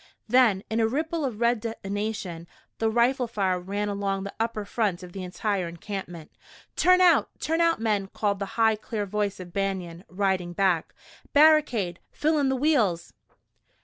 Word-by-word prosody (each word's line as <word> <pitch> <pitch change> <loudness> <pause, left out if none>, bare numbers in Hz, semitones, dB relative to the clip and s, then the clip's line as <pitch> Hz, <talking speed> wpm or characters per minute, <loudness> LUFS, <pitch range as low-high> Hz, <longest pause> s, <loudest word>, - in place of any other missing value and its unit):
Then, 225 -5 +4
in 220 - -1
a 225 - +3
ripple 315 +6 -2
of 245 -6 -3
red 235 0 +2
detonation, 205 -5 -4 0.3
the 225 - +2
rifle 240 +2 +2
fire 190 -5 0
ran 200 +3 -3
along 200 -1 -2
the 200 - -6
upper 225 -2 -2
front 200 -4 -1
of 175 -1 -11
the 195 - -6
entire 185 0 -2
encampment. 170 -1 -7 0.4
"Turn 365 0 +5
out! 345 -4 +5
Turn 325 +2 0
out, 335 -5 +3
men!" 210 -3 0
called 200 0 -1
the 200 - -3
high, 225 -1 +4
clear 215 -1 -4
voice 205 0 -2
of 175 -2 -10
Banion, 190 -3 -3
riding 185 -2 -1
back. 180 -3 +1 0.4
"Barricade! 285 - +4
Fill 310 0 +1
in 275 -2 +2
the 265 - +1
wheels!" 250 - +1
205 Hz, 165 wpm, -26 LUFS, 190-240 Hz, 0.4 s, Turn